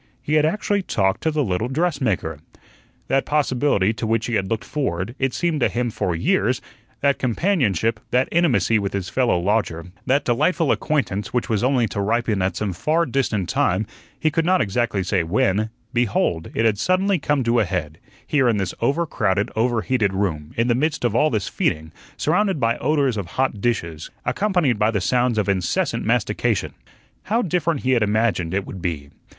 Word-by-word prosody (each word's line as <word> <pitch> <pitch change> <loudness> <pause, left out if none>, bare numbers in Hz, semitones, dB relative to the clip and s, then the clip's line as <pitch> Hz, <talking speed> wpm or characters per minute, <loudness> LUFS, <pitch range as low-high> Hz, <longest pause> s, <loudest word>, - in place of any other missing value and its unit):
He 150 - -4
had 155 0 +4
actually 205 +2 0
talked 95 - 0
to 160 - +1
the 150 -1 0
little 100 +1 -1
dressmaker. 130 - -1 0.7
That 135 0 +2
possibility 130 -8 +1
to 110 0 -4
which 115 0 +1
he 120 - -3
had 95 -3 0
looked 115 -2 -1
forward, 115 - -2
it 135 -1 +1
seemed 170 -1 -1
to - - +2
him 120 -1 -1
for 90 -4 -1
years 80 - +1 0.4
that 140 0 +2
companionship, 115 - +1
that 125 +2 +2
intimacy 150 -9 +3
with 100 -1 -3
his 95 -2 -3
fellow 125 -7 +2
lodger, 90 -3 -1 0.2
that 140 +3 +2
delightful 155 +6 +2
acquaintance 125 -9 -1
which 125 - 0
was 110 -1 0
only 130 -2 +3
to 100 +2 -3
ripen 110 -1 0
at 95 +1 0
some 105 -3 -2
far 160 - +1
distant 115 - -1
time, 95 +3 +1 0.3
he 155 - +1
could 165 +2 +1
not 185 +2 +3
exactly 110 -1 0
say 90 0 +1
when 95 +5 +1 0.2
behold, 105 -8 0
it 115 - +1
had 105 -3 +2
suddenly 185 - +2
come 145 -2 0
to 115 0 +2
a - - +4
head, 80 -4 -4 0.3
here 135 -4 +2
in 110 - +1
this 95 -3 -2
over 140 +8 +1
crowded, 105 - 0
over 115 0 +1
heated 105 -7 0
room, 80 -7 -2
in 115 +1 +2
the 120 - +3
midst 145 +1 0
of 120 - +1
all 150 +6 +3
this 110 - -1
feeding, 80 +1 -1 0.3
surrounded 190 +2 +1
by 115 -1 +2
odors 140 -6 +1
of 100 -4 -3
hot 130 -6 0
dishes, 85 -10 -2 0.2
accompanied 180 - +1
by 105 +1 +3
the 110 -3 0
sounds 120 +5 +1
of 105 - +1
incessant 95 -3 0
mastication. - - 0 0.5
How 230 +5 +1
different 170 -4 0
he 130 - 0
had 120 -3 +3
imagined 105 -5 +1
it 100 - -1
would 95 - -8
be! 75 -5 -4
115 Hz, 190 wpm, -22 LUFS, 100-145 Hz, 0.7 s, had